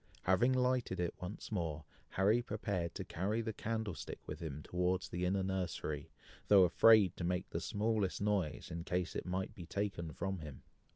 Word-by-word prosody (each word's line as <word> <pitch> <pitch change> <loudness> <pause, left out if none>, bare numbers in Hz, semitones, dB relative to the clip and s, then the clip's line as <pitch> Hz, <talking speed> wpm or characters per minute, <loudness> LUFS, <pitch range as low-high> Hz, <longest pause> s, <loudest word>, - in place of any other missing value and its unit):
Having 105 +8 +4
lighted 125 -6 +1
it 85 -1 0
once 90 +5 -6
more, 80 -6 -2 0.2
Harry 105 +5 +3
prepared 100 -6 -2
to - - -3
carry 100 +6 -1
the 110 -1 -2
candlestick 110 -6 -3
with - - -6
him 75 -2 -5
towards 90 +1 0
the 90 +1 -2
inner 95 +1 +1
nursery, 90 -5 -2 0.4
though 100 -2 +8
afraid 100 +1 +6
to - - -4
make 90 +1 0
the - - -2
smallest 105 -2 0
noise, 100 -7 0
in 85 0 -4
case 90 0 -1
it - - -3
might 95 +1 -2
be 85 - -9
taken 95 -5 -2
from 95 +4 -3
him. 75 -4 -9
95 Hz, 175 wpm, -36 LUFS, 85-105 Hz, 0.4 s, though